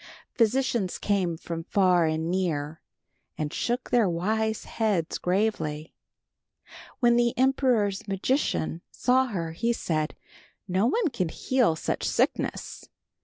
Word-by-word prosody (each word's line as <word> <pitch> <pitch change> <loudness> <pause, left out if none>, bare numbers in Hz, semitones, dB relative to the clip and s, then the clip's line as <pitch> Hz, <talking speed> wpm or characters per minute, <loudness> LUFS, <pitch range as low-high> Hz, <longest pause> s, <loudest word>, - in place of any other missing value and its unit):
Physicians 235 -4 +1
came 185 -5 0
from 165 0 -5
far 180 -2 +3
and 160 +2 -1
near, 160 -5 -2 0.6
and 150 -1 -3
shook 245 +1 -2
their 230 -6 +4
wise 220 +6 -1
heads 200 -8 -1
gravely. 175 -6 -1 1.1
When 240 -1 +5
the 240 -1 +2
emperor's 250 -7 +2
magician 195 - -1
saw 260 +1 +2
her, 170 -8 -3
he 230 +9 0
said, 155 -8 -2 0.5
"No 190 +4 +2
one 395 - +1
can 185 - -2
heal 245 -1 +1
such - - -3
sickness. - - -1
195 Hz, 120 wpm, -27 LUFS, 165-235 Hz, 1.1 s, When